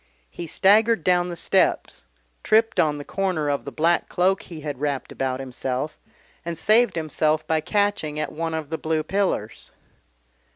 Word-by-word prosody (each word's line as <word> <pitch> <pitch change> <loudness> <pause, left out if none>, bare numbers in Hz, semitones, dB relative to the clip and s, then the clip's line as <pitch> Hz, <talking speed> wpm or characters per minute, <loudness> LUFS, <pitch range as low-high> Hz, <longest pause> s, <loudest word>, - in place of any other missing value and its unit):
He 170 - -7
staggered 215 +3 +4
down 180 0 +2
the 175 - -5
steps, 185 +3 +1 0.4
tripped 225 +1 +2
on 150 -2 +2
the 145 - -8
corner 185 -6 -1
of 140 - -3
the 140 - -6
black 165 +6 +1
cloak 190 +2 +1
he 165 -3 -10
had 145 -3 -5
wrapped 145 -3 -2
about 130 -1 -2
himself, 130 +2 -4 0.4
and 170 0 -4
saved 225 +6 +3
himself 155 -1 0
by 160 -1 +1
catching 200 -5 0
at 155 - -2
one 165 +1 -3
of 155 -1 -5
the 160 - -2
blue 155 0 -1
pillars. 190 - -2
160 Hz, 165 wpm, -23 LUFS, 150-190 Hz, 0.4 s, staggered